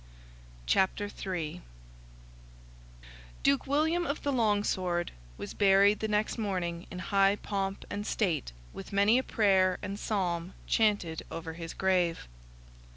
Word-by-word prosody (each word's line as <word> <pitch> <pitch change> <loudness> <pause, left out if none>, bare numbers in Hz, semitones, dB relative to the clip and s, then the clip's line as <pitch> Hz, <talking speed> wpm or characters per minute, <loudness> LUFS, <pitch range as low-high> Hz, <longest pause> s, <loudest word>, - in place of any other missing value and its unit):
CHAPTER 195 - +1
III 175 -6 -4 1.8
Duke 140 - +2
William 320 +5 +1
of 280 - -3
the 285 - 0
Long 210 -4 +2
Sword 175 -3 -1 0.3
was - - -6
buried 200 +1 +5
the 220 - -1
next 210 +2 0
morning 180 -5 -2
in 180 - -8
high 195 +1 +3
pomp 195 -1 -3
and 205 +1 -4
state, 165 - 0 0.2
with 95 - -9
many 200 +5 +4
a - - -2
prayer 190 -6 +3
and 200 0 -4
psalm 180 -5 -2
chanted 205 -8 +1
over 160 0 -6
his 165 0 -7
grave. 180 - +1
195 Hz, 130 wpm, -30 LUFS, 175-210 Hz, 1.8 s, buried